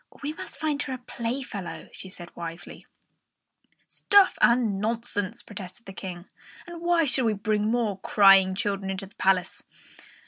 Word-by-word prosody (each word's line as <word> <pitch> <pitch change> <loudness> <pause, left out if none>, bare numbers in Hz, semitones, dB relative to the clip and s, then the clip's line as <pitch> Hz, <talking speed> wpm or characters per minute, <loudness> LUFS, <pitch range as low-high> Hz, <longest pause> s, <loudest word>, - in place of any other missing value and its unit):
"We 295 +2 -2
must - - -9
find 300 -2 -1
her 265 - -4
a - - -3
playfellow," 235 -5 -5
she 190 - -10
said 175 -2 -9
wisely. 170 0 -8 1.0
"Stuff 405 -2 +4
and 230 -5 +3
nonsense!" 230 -1 -2
protested 190 +3 -9
the 195 - -9
King. 180 -1 -7 0.4
"Why 345 -1 +1
should 255 -2 +1
we 220 - +2
bring 210 +1 0
any 215 +1 +1
more 225 -5 0
crying 195 -3 +6
children 195 -1 -2
into 195 0 -3
the 195 - -18
palace? 190 -2 +1
210 Hz, 150 wpm, -26 LUFS, 190-245 Hz, 1.0 s, crying